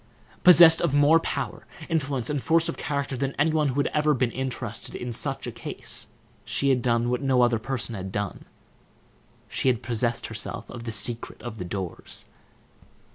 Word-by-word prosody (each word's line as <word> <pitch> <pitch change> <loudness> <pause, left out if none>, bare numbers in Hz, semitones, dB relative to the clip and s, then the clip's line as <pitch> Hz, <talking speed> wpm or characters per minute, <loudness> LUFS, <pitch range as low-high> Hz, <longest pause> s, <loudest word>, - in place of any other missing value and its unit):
Possessed 170 -2 +9
of 155 -5 +1
more 145 +3 +6
power, - - -4 0.2
influence, 140 -7 -1
and 145 -2 -1
force 165 +3 +3
of - - -2
character 140 -2 -2
than 135 +1 -2
any 155 +3 +3
one 155 -1 +2
who 130 - -2
had 145 - +1
ever 150 0 +3
before 125 -2 0
been - - -14
interested 130 -2 -4
in 120 -1 -4
such 135 +4 -2
a 120 - -4
case, 115 0 -5 0.4
she 140 - 0
had 130 -2 +3
done 120 0 +1
what 125 - -1
no 130 -3 +3
other 120 -2 +2
person 120 -1 -3
had 95 -2 -5
done, 100 -1 -4 1.0
she - - -2
had 120 -1 0
possessed 120 0 0
herself - - -5
of 115 -1 -8
the 115 - -3
secret 115 +2 -1
of 115 -3 -7
the 90 - -4
doors. 95 -1 -5
130 Hz, 185 wpm, -26 LUFS, 115-145 Hz, 1.0 s, Possessed